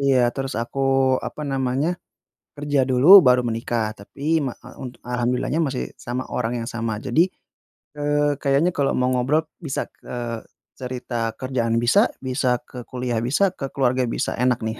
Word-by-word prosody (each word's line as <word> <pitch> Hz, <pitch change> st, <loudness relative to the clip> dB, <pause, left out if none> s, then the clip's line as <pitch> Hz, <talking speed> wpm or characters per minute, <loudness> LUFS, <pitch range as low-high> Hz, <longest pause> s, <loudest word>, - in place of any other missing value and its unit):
iya, 135 Hz, -2 st, +3 dB, 0.2 s
terus 135 Hz, -1 st, -3 dB
aku 120 Hz, +3 st, -7 dB, 0.5 s
apa -, -, -7 dB
namanya, 135 Hz, +3 st, 0 dB, 0.7 s
kerja 145 Hz, -1 st, 0 dB
dulu 130 Hz, +3 st, +3 dB, 0.2 s
baru 125 Hz, 0 st, +5 dB
menikah. 115 Hz, 0 st, -1 dB, 0.2 s
Tapi 100 Hz, +7 st, -14 dB, 0.2 s
ma 130 Hz, -, -2 dB
e -, -, -12 dB
unt 125 Hz, -2 st, -6 dB, 0.2 s
alhamdulillahnya 125 Hz, +5 st, 0 dB
masih 130 Hz, -2 st, -2 dB, 0.2 s
sama 125 Hz, +2 st, -2 dB
orang 120 Hz, -1 st, -1 dB
yang -, -, -6 dB
sama, 115 Hz, -1 st, -2 dB
jadi, 160 Hz, -, +3 dB, 0.8 s
eee, 145 Hz, -1 st, +1 dB
kayaknya 140 Hz, +6 st, +2 dB
kalau 140 Hz, -1 st, +2 dB
mau 125 Hz, 0 st, +2 dB
ngobrol 130 Hz, +5 st, +2 dB, 0.2 s
bisa 140 Hz, -, -2 dB
ke -, -, -13 dB, 0.7 s
cerita 125 Hz, -1 st, -5 dB, 0.2 s
kerjaan 125 Hz, -3 st, -1 dB
bisa, 120 Hz, -, +4 dB, 0.3 s
bisa 130 Hz, 0 st, -1 dB, 0.2 s
ke -, -, -12 dB
kuliah 125 Hz, -2 st, -2 dB
bisa, 145 Hz, +10 st, +2 dB, 0.2 s
ke 135 Hz, -, -2 dB
keluarga 130 Hz, -1 st, +2 dB
bisa, -, -, -1 dB
enak 125 Hz, -1 st, +2 dB
nih, 110 Hz, -, -2 dB
130 Hz, 160 wpm, -23 LUFS, 125-140 Hz, 0.8 s, baru